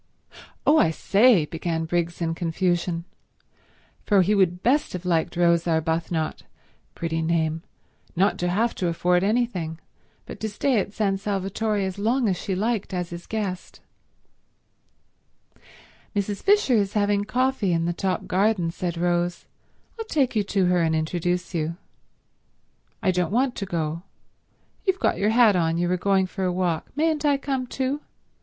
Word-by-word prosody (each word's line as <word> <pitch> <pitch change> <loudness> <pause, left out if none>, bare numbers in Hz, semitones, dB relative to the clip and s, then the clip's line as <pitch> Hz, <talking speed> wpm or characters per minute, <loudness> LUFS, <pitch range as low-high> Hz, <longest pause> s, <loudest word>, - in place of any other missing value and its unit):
"Oh, 310 +2 +5
I 165 - +4
say—" 200 +2 +4
began 165 +1 -3
Briggs 170 +1 -2
in 165 0 0
confusion, 170 0 -1 1.0
for 200 -3 +4
he 205 +4 +2
would 180 -3 +2
best 285 +5 +2
have 180 0 -6
liked 170 -1 0
Rose 170 -1 +3
Arbuthnot—pretty 160 0 -3
name—not 165 +3 -2
to 175 - 0
have 225 +6 +1
to 180 - 0
afford 180 +2 +1
anything, 200 -7 0 0.5
but - - -9
to 220 - -2
stay 235 +3 +1
at 200 - -3
San 195 -3 0
Salvatore 205 +2 -1
as 190 +1 -5
long 235 +4 +1
as 190 - +1
she 190 +2 -3
liked 210 -1 -1
as 180 -1 -3
his 170 0 -8
guest. 200 -5 -4 2.4
"Mrs. 200 0 -2
Fisher 405 -9 +3
is 200 -2 0
having 205 -1 +1
coffee 250 -3 0
in 165 -1 +1
the 175 - 0
top 190 +2 -2
garden," 190 -2 +1
said 175 0 -4
Rose. 175 0 0 0.5
"I'll 450 - -3
take 275 - 0
you 215 - +3
to 195 -1 +1
her 180 -1 +3
and 160 -1 +1
introduce 175 +3 -1
you." 165 0 -2 1.3
"I 185 - +3
don't 180 -1 0
want 250 +4 +1
to 195 - -4
go. 165 -2 -2 0.8
You've 380 -2 +1
got - - +1
your 205 - +2
hat 225 -3 +5
on, 165 -2 +1
so 170 - 0
you 175 - +1
were 180 - +1
going 190 +1 +2
for 190 +1 -5
a 180 - +1
walk. 175 -3 -1
Mayn't 310 0 +1
I 290 -2 +3
come 270 -2 -3
too? 270 +3 -2
185 Hz, 160 wpm, -24 LUFS, 170-215 Hz, 2.4 s, Oh